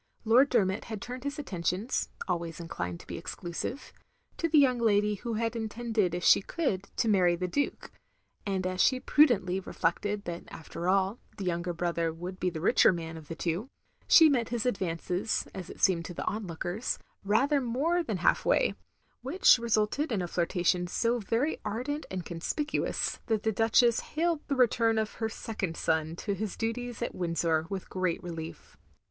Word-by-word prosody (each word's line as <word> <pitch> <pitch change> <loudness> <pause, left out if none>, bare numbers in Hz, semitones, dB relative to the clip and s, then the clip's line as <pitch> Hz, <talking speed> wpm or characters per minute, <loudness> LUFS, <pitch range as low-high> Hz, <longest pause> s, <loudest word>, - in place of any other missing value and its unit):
Lord 250 +6 +5
Dermot 190 +1 +1
had 220 -3 -5
turned 250 +4 -7
his 285 +1 -3
attentions 195 - -2 0.2
(always 170 -2 -2
inclined 90 - -5
to - - -16
be - - -6
exclusive) 175 +10 -5 0.4
to 335 - 0
the 315 - +4
young 260 -4 +5
lady 210 -2 +3
who 225 +3 -4
had 230 +1 -1
intended 220 -4 -1
if 175 - -4
she - - +6
could 200 - -2
to - - +1
marry 185 -5 +4
the 180 +1 -2
Duke; 285 +10 -2 0.5
and 190 -2 -2
as 185 0 0
she 255 - +4
prudently 235 -12 +3
reflected 200 +3 -1
that 170 0 -5
after 170 +2 -5
all, 195 +3 +2 0.2
the 200 - -5
younger 175 0 -1
brother 170 -1 -1
would 180 +3 -7
be 185 - +1
the 165 -2 -6
richer 170 - +5
man 165 -2 -5
of 160 -2 -10
the 165 - -5
two, 175 +10 -2 0.4
she 325 - +8
met 250 -6 +1
his 235 -1 -2
advances, 185 -2 -1
as 185 -2 -7
it - - -10
seemed 170 -3 +3
to 175 - -7
the - - -4
onlookers, 190 +1 -3 0.3
rather 270 +8 +3
more 280 +9 +1
than 220 - -2
half 175 - +2
way; - - +3 0.5
which 365 -9 +5
resulted 230 +5 +1
in 215 - +1
a - - -3
flirtation 175 +1 +1
so 235 +6 0
very 235 +8 0
ardent 250 +8 -3
and 185 -3 -4
conspic 180 - -3
uous - - -1
that 220 -3 0
the 220 - +2
Duchess 225 +2 +4
hailed 330 0 -1
the 280 - 0
return 230 -3 +3
of 220 -1 -1
her 225 - +1
sec 225 0 -7
ond 165 -5 -2
son 160 0 0
to 200 +3 -3
his 205 +1 -4
duties 240 +1 -3
at - - -3
Windsor 165 -2 0
with 195 -2 -4
great 185 -2 -1
relief. 165 -2 -7
205 Hz, 185 wpm, -29 LUFS, 175-240 Hz, 0.5 s, she